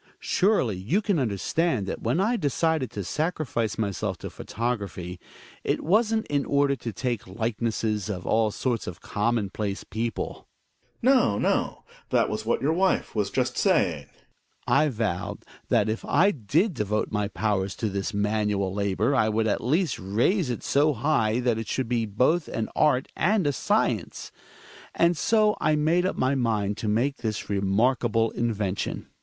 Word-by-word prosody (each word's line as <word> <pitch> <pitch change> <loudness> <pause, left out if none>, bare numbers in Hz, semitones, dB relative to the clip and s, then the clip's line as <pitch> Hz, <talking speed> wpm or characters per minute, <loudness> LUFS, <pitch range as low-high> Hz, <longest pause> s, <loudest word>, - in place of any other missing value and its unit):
Surely 185 - +2
you 110 - 0
can 200 -6 0
understand 125 - 0
that 95 - -5
when 125 +9 0
I 220 +6 +2
decided 160 - 0
to 100 - -5
sacrifice 145 - -2
myself 100 -3 -2
to - - -7
photography, 100 -6 -4 0.4
it - - -1
wasn't 220 +5 +2
in 145 -1 0
order 140 -1 +2
to 115 0 -5
take 120 +1 -3
likenesses 110 0 -2
of 95 -3 -4
all 110 -1 +2
sorts 120 +2 -2
of 90 - -6
commonplace 105 -2 -2
people. 115 +1 -4 0.6
Gregers. 265 +3 +6
No, 110 - +3
no, - - 0 0.3
that - - +2
was 110 +1 -4
what 120 - +1
your 155 +3 +2
wife 190 +2 +1
was 105 -3 0
just - - -1
saying. - - +2 0.6
Hjalmar. - - +3
I - - 0
vowed 105 -8 -3 0.2
that - - +3
if 110 +1 -2
I 200 +4 +4
did 160 - +1
devote 105 -4 -1
my 105 -1 0
powers 100 -2 -1
to 110 - -2
this 100 +1 -2
manual 105 -2 0
labor 100 +5 0
I 110 -5 +3
would 110 +1 +1
at 110 - 0
least 160 +8 +1
raise 125 - +1
it 120 - -3
so 145 +2 +3
high 120 -3 +1
that 120 -3 +1
it 115 - -5
should 130 +1 -1
be 115 -2 0
both 130 - +1
an 110 - -3
art 140 -4 +3
ajid^A 185 -5 +2 0.4
acience. - - -7 0.7
^nd 170 +1 +4
so 215 +5 +3
I 155 0 +3
made 165 +4 +2
up - - -3
my 130 +2 +2
mind 110 -5 0
to 110 - -4
make 120 +7 +1
this 110 -3 -4
remarkable 115 +3 +2
invention. 105 -5 -2
115 Hz, 165 wpm, -26 LUFS, 105-150 Hz, 0.7 s, Gregers